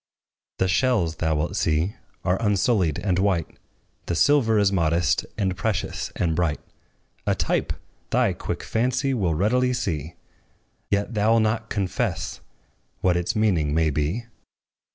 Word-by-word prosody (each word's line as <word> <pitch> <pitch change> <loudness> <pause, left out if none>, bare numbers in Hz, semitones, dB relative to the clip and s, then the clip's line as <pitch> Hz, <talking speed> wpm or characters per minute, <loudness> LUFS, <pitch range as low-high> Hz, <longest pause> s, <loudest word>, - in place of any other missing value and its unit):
The 95 - +2
shells, 90 -5 +1
thou 80 -1 +1
wilt 85 +6 -1
see, 85 +1 +1 0.3
are 90 +4 +1
unsullied 100 - +2
and 90 0 0
white; 95 -5 0 0.5
The 85 - -1
silver 115 - +4
is 100 -2 +3
modest, 85 -2 +1
and 95 -3 0
precious, 105 +1 -2
and 80 -2 0
bright, 80 -3 0 0.7
A - - +3
type! - - 0 0.4
thy - - +2
quick - - -5
fancy 125 +4 0
will 95 -10 0
readily 125 +8 +2
see, 85 - -3 0.7
Yet 100 +3 0
thou 110 +1 +3
'lt 115 - +4
not 110 0 -1
confess 95 -3 -2 0.6
what 90 -2 +3
its 90 0 -1
meaning 85 -9 +2
may 80 -1 +2
be. 75 - -1
95 Hz, 140 wpm, -24 LUFS, 85-110 Hz, 0.7 s, silver